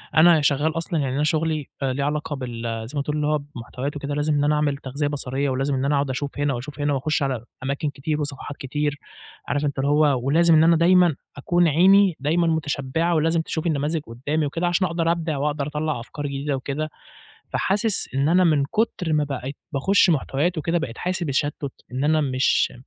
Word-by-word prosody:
أنا 160 0 +6
شغّال 150 +2 +1
أصلًا 165 0 -2
يعني 135 -2 -1
أنا 145 - +1
شُغلي 155 -1 0 0.2
آآ 130 -1 0
ليه 140 +2 -2
علاقة 150 +1 -2
بال 115 -3 -4
زي 145 - -6
ما - - -1
تقول 150 +1 -1
هو 150 0 +2
بمحتويات 140 0 -6
و - - -4
كده 145 0 -4
لازم 150 +1 0
إن 145 - +2
أنا 150 +1 +3
أعمل 150 -2 0
تغذية 140 +2 -3
بصرية 140 -1 -2
ولازم 135 +2 0
إن 130 +1 -1
أنا 145 +1 +2
أقعد 140 -1 0
أشوف 140 +2 -4
هِنا 145 -1 +1
وأشوف 135 +4 -7
هِنا 145 0 +1
وأخُش 145 +3 0
على 130 -4 -2 0.2
أماكن 140 +3 -1
كتير 150 +3 -3
وصفحات 145 0 -6
كتير. 145 +1 -2 0.5
عارف 145 +1 0
أنت 140 -1 -2
اللي 140 +1 +1
هو 145 -3 +3
ولازم 165 +4 +4
إن 155 - +6
أنا 165 +1 +5
دايمًا 175 -1 +4 0.2
أكون 175 +5 +2
عيني 185 +3 +5
دايمًا 165 +5 +1
متشبعة 160 +1 0
ولازم 165 +1 +2
تشوف 160 +1 -3
النماذج 155 +1 0
قدّامي 145 +5 -2
وكده 165 +5 -1
عشان 175 +2 +2
أقدر 165 0 0
أبدِع 165 -3 -2
وأقدر 145 0 -1
أطلّع 150 -2 -2
أفكار 145 +5 -6
جديدة 140 +1 -2
وكده. 140 +3 -3 0.6
فحاسس 205 +2 0
إن 135 +2 +2
أنا 180 +3 +4
من 150 -4 +3
كُتر 180 -1 -1
ما 150 -1 +2
بقيت 140 -1 -5 0.2
باخش 185 +7 +3
محتويات 155 +3 0
وكده 165 +3 0
بقيت 125 -8 -5
حاسس 180 0 -2
بتشتت 145 -2 -2 0.2
إن 130 +3 -2
أنا 155 +1 +3
مش 130 -2 +1
145 Hz, 205 wpm, -23 LUFS, 140-160 Hz, 0.6 s, أنا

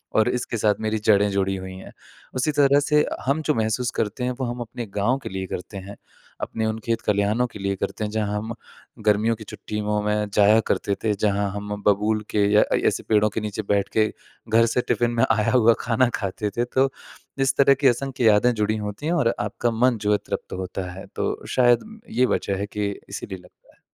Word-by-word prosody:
और 110 +2 +4
इसके 125 -1 -2
साथ 105 -1 +2
मेरी 110 0 0
जड़ें 105 -1 +4
जुड़ी 95 0 0
हुई 95 0 -7
हैं। 95 - -11 0.4
उसी 130 +4 +1
तरह 140 0 +6
से 150 +1 +2 0.2
हम 140 +4 +1
जो 150 - +4
महसूस 115 +2 0
करते 115 +4 -2
हैं, 125 - 0
वो 130 - -1
हम 120 +1 -4
अपने 120 +1 -6
गाँव 115 +6 +2
के - - -5
लिए 95 0 -4
करते 95 +3 -6
हैं, 100 +2 -8 0.5
अपने 110 0 -2
उन 110 0 -2
खेत-खलिहानों 110 +1 +1
लिए 100 0 -1
करते 110 - -4
हैं 105 - -4
जहाँ 105 -1 -1
हम 110 +2 -4 0.5
गर्मियों 105 +2 +3
की 110 - -9
छुट्टियों 105 0 -3
में 105 0 0
जाया 105 +2 +6
करते 100 - 0
थे, 110 - +2
जहाँ 100 0 0
हम 105 +1 -5
बबूल 105 +2 +2
के 105 -1 +3
या 105 - +7
अ, - - +1
ऐसे - - 0
पेड़ों 105 0 +4
के 110 - -3
नीचे 105 0 -3
बैठ 100 -1 +2
के 110 0 +5 0.4
घर 115 +1 +5
से 125 - +3
टिफ़िन 120 -1 +2
में - - +5
आया 110 -1 +2
हुआ 115 -2 +5
खाना 120 +1 +2
खाते 100 +1 -3
थे। 120 - +2
तो 130 +2 +2 0.6
इस - - +2
तरह 140 0 +6
की 135 0 +2
असंख्य 130 0 0
यादें 110 +4 +5
जुड़ी 110 0 0
होती 105 +7 -5
हैं 170 - +1
और 130 -9 +2
आपका 110 +3 -1
मन 120 +1 +2
जो 105 0 +1
है 105 - +4
तृप्त - - -5
होता 95 0 -4
है, 95 +2 -9
तो - - -2
शायद 125 - +4 0.2
ये 125 - +2
वजह 100 - -2
है 100 - -1
कि 105 -1 -2 0.2
इसीलिए 95 - -6
लगता 90 - -22
है। - - -35
110 Hz, 215 wpm, -23 LUFS, 105-120 Hz, 0.6 s, या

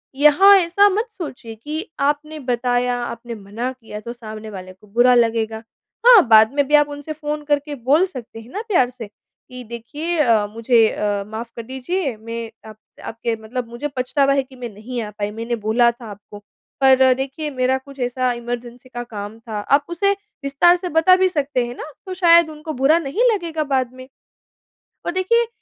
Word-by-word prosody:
यहाँ 300 +8 +7
ऐसा 370 +3 +4
मत 430 +5 -1
सोचिए 250 -10 -7
कि 305 - -5
आपने 295 +2 -1
बताया, 245 -1 0
आपने 235 0 -6
मना 215 +5 -5
किया 225 -5 -10
तो 235 +3 -7
सामने 220 -2 -9
वाले 185 -2 -9
को 190 +3 -22
बुरा 240 +4 +4
लगेगा। 225 -2 +1 0.5
हाँ, 465 - +8
बाद 220 -1 +7
में 285 -1 +1
भी 300 - +4
आप 295 0 +4
उनसे 290 +2 -6
फ़ोन 300 0 -4
करके 290 0 -1
बोल 305 +7 +5
सकते 250 -10 -9
हैं 225 +1 -13
ना 415 - -4
प्यार 345 - +3
से 245 -3 -9
कि 250 +4 -15
देखिए 290 +9 -5
अ, 230 -7 +3
मुझे 230 +1 +3
अ, 205 -1 -2
माफ़ 220 +2 -6
कर 230 - -6
दीजिए 265 +4 -3
मैं 230 +1 -6 0.2
आप 215 - -13 0.3
आपके 230 0 -3
मतलब 240 +2 -5
मुझे 240 +5 -4
पछतावा 275 +2 +2
है 275 -1 +1
कि 260 0 -17
मैं 245 -2 -6
नहीं 235 +4 -6
आ 215 - -5
पाई। 205 0 -2
मैंने 230 +2 -3
बोला 230 +2 +2
था 235 0 -14
आपको, 205 +1 -12 0.4
पर 260 -1 +6
देखिए 270 +4 -4
मेरा 255 0 +1
कुछ 275 +1 -14
ऐसा 250 0 0
इमरजेंसी 240 +1 -6
का 240 -1 -6
काम 210 -2 -8
था। 220 -2 -6
आप 280 +7 +2
उसे 360 +4 +1 0.3
विस्तार 280 +6 +4
से 360 0 -5
बता 365 +3 +6
भी 375 0 +3
सकते 285 -7 -1
हैं 240 +1 -7
ना, 310 - -8
तो 375 - -5
शायद 340 -2 +5
उनको 310 +1 -7
बुरा 300 +4 +5
नहीं 335 - -1
लगेगा 335 -6 -2
बाद 255 -2 0
में। 255 0 -12 1.0
और - - -1
देखिए 455 +6 +1
255 Hz, 190 wpm, -20 LUFS, 230-300 Hz, 1.0 s, हाँ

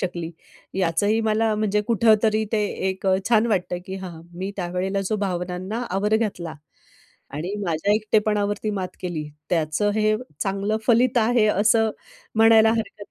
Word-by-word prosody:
शकली. 175 -3 -3 0.5
याचंही 195 +5 +1
मला 220 0 +2
म्हणजे 210 -1 +1
कुठंतरी 220 0 +3
ते 210 -1 +2 0.2
एक 190 +1 -4 0.2
छान 230 -1 +4
वाटतं, 180 -4 -1
की 190 0 -5
हा, 185 -2 -7 0.2
मी 190 +3 -4
त्यावेळेला 185 +2 -2
जो 215 - +1
भावनांना 185 +5 -3
आवर 205 +3 +1
घातला 180 -8 -3 0.8
आणि 175 +7 -4
माझ्या 170 +4 0
एकटेपणावरती 210 -1 0
मात 190 -3 -3
केली, 160 -4 -4 0.2
त्याचं 165 +5 +1
हे 215 0 +2 0.2
चांगलं 200 +2 -1
फलित 245 +1 +4
आहे, 225 -1 +3
असं 215 +2 +3 0.5
म्हणायला 225 0 +6
हरकत 215 -2 -4
205 Hz, 135 wpm, -23 LUFS, 185-220 Hz, 0.8 s, म्हणायला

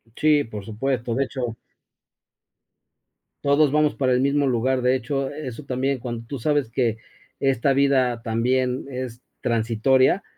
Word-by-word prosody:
Sí, 150 -1 +3
por 105 -5 -8
supuesto, 120 +2 -2
de 135 +2 +1
hecho 125 -3 -4 1.9
todos 145 0 +4
vamos 150 0 +2
para 130 -2 +1
el 125 - +3
mismo 140 +1 +2
lugar. 130 +1 +1
De 125 +1 +3
hecho, 135 +2 -2
eso 145 -2 -7
también, 135 0 -1
cuando 120 -1 -5
tú 140 +1 -5
sabes 145 -1 +1
que 115 -2 0 0.4
esta 135 -1 +2
vida 130 -3 +2
también 125 +2 0
es 125 -2 -6 0.2
transitoria, 120 - +2
130 Hz, 140 wpm, -23 LUFS, 120-140 Hz, 1.9 s, todos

